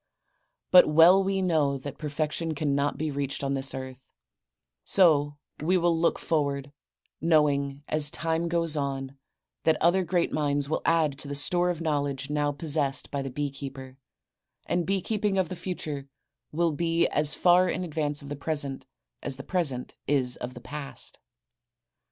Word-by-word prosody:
But 180 -4 +8
well 170 +5 +6
we 195 0 0
know 150 -6 +1
that 140 +1 -8
perfection 155 +2 -2
cannot 145 -1 0
be 155 +1 -2
reached 140 0 -3
on 140 0 0
this 135 0 -1
earth, 130 0 -8
and - - -62
so 145 -6 +3 0.2
we 180 +5 +2
will 170 -1 +2
look 165 +1 +1
forward, 140 -3 -1 0.5
knowing 145 -3 +2
as 150 -1 +5
time 165 +2 -1
goes 165 -2 +1
on 135 -1 -4 0.4
that 160 - +2
other 175 +3 +3
great 175 0 0
minds 145 -2 0
will 155 - -1
add 155 -4 +2
to 145 - -7
the 140 - -4
store 175 +5 +2
of 170 -2 -3
knowledge 145 -3 -2
now 145 -1 +1
possessed 145 -2 -1
by 140 - -2
the 135 - -4
bee 145 +2 -3
keeper, 135 -1 -9 0.7
and 175 -1 -1
bee 195 0 +1
keeping 210 -1 -1
of 185 -4 +1
the 185 - -5
future 150 -6 -5 0.4
will 165 +1 +1
be 165 +2 +1
as 150 0 +2
far 180 +1 +4
in 185 - -2
advance 150 -3 -2
of 140 - -9
the 145 - -4
present 140 -3 -3 0.3
as 135 - -3
the 135 - -9
present 145 -9 -2
is 130 -3 +1
of 125 +1 -7
the 120 - -9
past. 140 +2 -3
150 Hz, 170 wpm, -27 LUFS, 140-165 Hz, 0.7 s, But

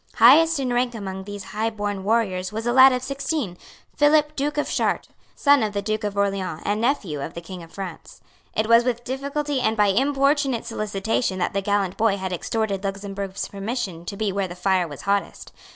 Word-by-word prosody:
Highest 325 -1 +6
in 255 -2 -1
rank 245 0 0
among 190 -3 -6
these 205 0 -7
highborn 210 -2 -2
warriors 195 -4 0
was 220 +2 -4
a 240 - +1
lad 260 +1 +8
of 250 0 -1
sixteen, 275 - -2 0.4
Philip 300 0 +3
Duke 295 +1 -2
of 295 - 0
Chartres, - - -1 0.2
son 285 -1 +4
of 215 -2 -1
the 200 - -1
Duke 215 +1 -2
of 205 -1 -3
Orleans, 195 -5 -1
and 205 +2 0
nephew 205 - 0
of 165 - -7
the - - -4
King 175 +1 -9
of 165 -1 -13
France. 190 -4 -8 0.4
It 220 - +1
was 230 +1 +6
with 240 -1 -1
difficulty 280 +2 -2
and 220 -2 +1
by 205 -1 +4
importunate 275 +2 +2
solicitation 215 -2 -1
that 180 - -1
the 200 - 0
gallant 200 -2 0
boy 215 -2 +2
had 190 -1 -4
extorted 200 +2 -2
Luxemburg's 195 0 -4
permission 200 -4 -4
to 200 - -6
be 210 -1 0
where 195 0 -1
the 175 - -8
fire 185 -1 +1
was 145 -3 -9
hottest. 200 0 -2
210 Hz, 200 wpm, -23 LUFS, 195-255 Hz, 0.4 s, lad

